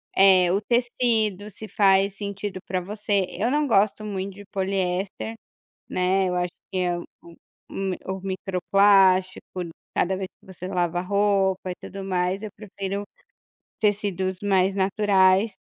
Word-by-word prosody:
eh, 185 -2 +6
o 195 - +1
tecido, 225 -4 0
se 215 +1 -9
faz 195 -1 +3
sentido 200 -1 -5
para 185 -1 -1
você. 205 +1 -1
Eu 215 +7 -1
não 295 +2 +2
gosto 215 -1 +2
muito 195 -2 -4
de 205 0 -11
poliéster, 190 +2 -2 0.6
né, 185 +1 +1
eu 180 - -1
acho 180 -1 -1 0.2
que 185 - -1
é 175 -1 0
o - - -7 0.2
u 170 -1 -15 0.3
um 195 -1 -2
o 190 0 -4
micro-plástico, 190 -1 +2 0.3
cada 190 +2 +1
vez 190 0 -3
que - - -24
você 185 0 -8
lava 175 -1 0
a - - -1
roupa, 195 -1 +1
e - - -3
tudo 195 0 -8
mais, 185 +1 -1
eu 215 - -5
prefiro 200 -1 -5 0.8
tecidos 195 -3 0
mais 195 -1 +2
naturais. 195 0 +3
195 Hz, 150 wpm, -24 LUFS, 185-205 Hz, 0.8 s, eh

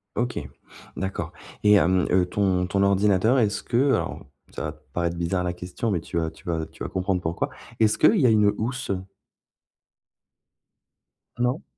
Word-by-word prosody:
OK. 120 +2 -1 0.6
D'accord. 95 0 -4 0.3
Et 105 0 +6
hem, 95 -1 +3
heu, 90 -1 +4
ton 90 -2 +1
ton 100 +1 +1
ordinateur, 100 +5 +3
est-ce 105 -2 0
que, 120 - -1
heu 135 +2 +4
alors - - -4 0.3
ça - - -5
va 75 - -3
te 75 - -17
paraître 85 0 -1
bizarre 90 +1 0
la 90 -1 -1
question, 90 +6 -4
mais 90 -5 0
tu 85 - -5
vas 80 -1 0
tu 80 - -18
vas 80 -2 -1
tu - - -10
vas - - -4
comprendre 95 0 0
pourquoi. 85 0 -2 0.3
Est-ce 110 -1 +3
qu'il - - +5
y 130 - +5
a - - +5
une 105 -2 +4
housse? 125 0 -3 2.5
Non? 125 +5 0
95 Hz, 180 wpm, -25 LUFS, 90-110 Hz, 2.5 s, Et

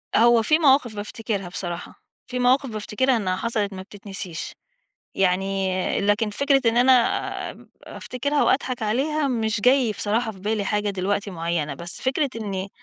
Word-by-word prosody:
هو 235 0 +6
في 305 +8 +3
مواقف 265 -7 +4
بافتكرها 205 -1 -4
بصراحة، 175 -1 -6 0.2
في 250 0 -4
مواقف 260 +2 +3
بافتكرها 230 +4 0
إنّها 185 -3 -1
حصلت 210 -2 -2
ما 185 - -6
بتتنسيش، 195 -3 -7 0.6
يعني 190 0 0
لكن 205 +2 +1
فكرة 275 +5 +2
إن 230 - -4
أنا 255 +2 +6 0.6
آآ، - - -15 0.2
أفتكرها 285 +4 -2
وأضحك 255 -3 +1
عليها 280 +7 0
مش 220 -3 -1
جاي 250 0 +4
بصراحة 220 +3 -1
في 190 - -15
بالي 210 0 -1
حاجة 205 +1 0
دلوقتي 200 +2 -2
معيّنة، 165 -4 -2
بس 170 +4 -3
فكرة 270 +2 0
إنّي 195 -3 -4
215 Hz, 150 wpm, -23 LUFS, 195-250 Hz, 0.6 s, هو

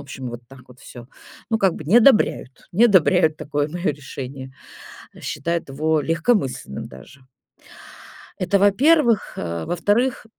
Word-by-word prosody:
общем, 130 -2 -8
вот 120 0 -8
так 135 -1 -16
вот 125 +1 -18
всё. 120 -1 -12 0.4
Ну, 225 - +1
как 195 -4 +2
бы, 155 - -9
не 185 +10 +3
одобряют 225 - +2
не 220 +7 +4
одобряют 180 -6 +3
такое 145 0 -2
моё 175 +3 -3
решение, 135 -2 -8 0.7
считают 165 +1 -4
его 155 +3 0
легкомысленным 165 - -1
даже. 100 - -15 1.2
Это, 195 +2 0
во-первых, 235 - +3
э. - - -4
А 85 -1 -4
во-вторых 205 +10 0
160 Hz, 140 wpm, -21 LUFS, 135-200 Hz, 1.2 s, не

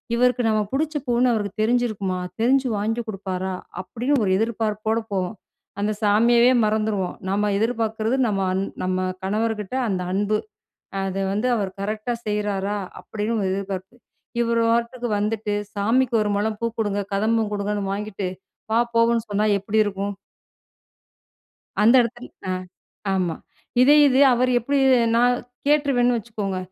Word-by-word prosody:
இவருக்கு 250 +1 +2
நம்ம 215 -1 +2
பிடிச்ச 310 +3 -1
பூன்னு 245 +1 +3
அவருக்கு 210 -1 -3
தெரிஞ்சிருக்குமா? 215 -6 0 0.2
தெரிஞ்சு 260 +3 +3
வாங்கி 225 +3 -1
கொடுப்பாரா?" 190 -2 -3 0.3
அப்படி 230 +6 -7 0.2
ஒரு 195 - +1
எதிர்பார்ப்போடு 220 0 -1
போவோம். 190 +2 -1 0.5
அந்த 210 +1 +1
சாமியவே 235 +4 +5
மறந்துருவோம், 215 -3 0
நம்ம 205 +1 +1
எதிர்பார்க்கிறது 225 +1 0
நம்ம 200 -3 0
அந் 190 +1 0 0.2
நம்ம 185 0 0 0.2
கணவர்கிட்ட 215 +2 -1
அந்த 185 -2 -1
அன்பு. 205 +2 +1 0.6
அத 195 0 -3 0.2
வந்து 210 +5 0
அவர் 200 -3 -1
கரெக்டா 215 +4 -2
செய்றாரா? 205 -1 -1 0.2
அப்படின்னு 220 +2 -3
ஒரு 195 - 0
எதிர்பார்ப்பு. 195 +2 -5 0.5
இவர் 235 0 +1
பாட்டுக்கு 235 +1 0
வந்துட்டு 210 0 -1 0.2
சாமிக்கு 235 +4 +2
ஒரு 210 - 0
முழம் 215 +1 -1
பூ - - 0
கொடுங்க, 205 -2 0
கதம்பம் 220 +2 +1
கொடுங்கன்னு 205 0 -2
வாங்கிட்டு, 205 -1 -4 0.4
"வா 225 - +4 0.2
போவோம்ன்னு" 230 0 +3
சொன்னா 205 +1 +1
எப்படி 200 +3 -2
இருக்கும்? 200 -1 -3 1.7
அந்த 230 +4 +6
இடத்து 240 +2 -6 0.2
ஆ - - +1 0.6
ஆமா. 180 -3 0 0.5
இதே 285 +3 +7
இது 265 0 +3
அவர் 255 +1 +2
எப்டி 275 +5 0 0.4
நா - - +4 0.5
கேட்டுருவேன்னு 275 -5 +3
வச்சுக்கோங்க. 210 -4 -4
215 Hz, 130 wpm, -23 LUFS, 200-235 Hz, 1.7 s, இதே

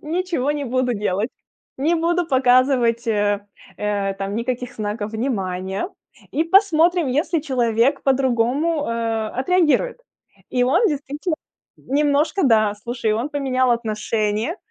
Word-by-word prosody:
Ничего 330 -4 -1
не 295 -1 -3
буду 255 -1 0
делать, 205 +1 -1 0.5
не 315 +6 +2
буду 340 +1 +1
показывать, 255 -3 +3
э, 205 -2 0 0.3
э, 200 -1 -1
там, 195 +1 -4
никаких 245 +2 -3
знаков 210 0 -4
внимания. 195 - -2 0.4
И 320 +3 0
посмотрим, 345 -3 +3
если 305 +5 0
человек 255 -2 +1
по-другому, 270 +4 +1
э, 230 -1 -1
отреагирует. 360 - +1 0.5
И 250 -1 +1
он 275 - +3
действительно 295 +2 -2 0.4
немножко 295 +6 +1
да, 215 -4 +3
слушай, 235 -2 -1
он 230 +6 -1
поменял 260 -4 0
отношение, 220 +3 -1
255 Hz, 120 wpm, -21 LUFS, 220-300 Hz, 0.5 s, показывать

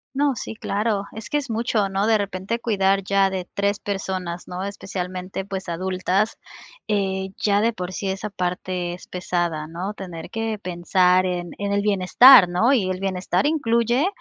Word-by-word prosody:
No. 285 -1 +2
Sí, 225 - -6
claro, 210 -1 -1
es 220 0 -9
que 295 - +1
es 280 -4 -4
mucho, 220 -2 0
¿no?, 195 +2 0
de 220 -1 +4
repente 200 +3 -3
cuidar 195 -4 +1
ya 195 0 +3
de 185 -1 -4
3 200 0 0
personas, 185 -3 -4
¿no?, 180 +1 -5
especialmente, 185 -1 -5
pues, 190 -2 -5
adultas, 185 +4 -1 0.5
eh, 190 -2 -1
ya 205 -1 +2
de 230 +1 +2
por 185 -2 -5
sí 195 0 -3
esa 195 +2 -3
parte 180 -1 -3
es 180 - -11
pesada, 175 -4 -2
¿no?, 180 +5 -5
tener 180 -4 -8
que 225 -1 -2
pensar 180 0 +2
en 175 -2 -3
en 200 0 -1
el 200 - +2
bienestar, 205 +2 +7
¿no?, 225 +10 +3
y 195 -8 +1
el 185 0 -2
bienestar 185 +1 -1
incluye 245 - +2
195 Hz, 175 wpm, -23 LUFS, 180-210 Hz, 0.5 s, bienestar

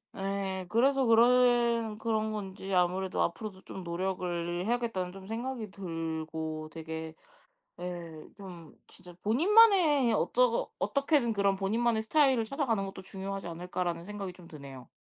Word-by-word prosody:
예. 195 -1 -3
그래서 265 +5 +3
그런 235 -1 +4
그런 220 -1 -1
건지 195 -2 -5
아무래도 185 +1 +1
'앞으로도 190 +2 -4
좀 190 - -8
노력을 175 -1 -2
해야겠다.'는 230 -6 -1
좀 190 0 -11
생각이 230 0 -4
들고 160 -3 -4
되게 160 0 -6 0.7
예. 170 -3 -6 0.2
좀 175 -5 -11
진짜 180 0 -14
본인만의 320 - +5
어쩌 240 +2 +2
어떻게든 280 -4 +1
그런 200 -1 +2
'본인만의 220 +3 +1
스타일을 265 -2 +3
찾아가는 230 -6 -1
것도 195 -1 -8
중요하지 195 0 -6
않을까.'라는 175 0 -3
생각이 200 -2 -5
좀 180 -1 -15
드네요. 140 -5 -11
195 Hz, 325 characters per minute, -30 LUFS, 175-235 Hz, 0.7 s, 본인만의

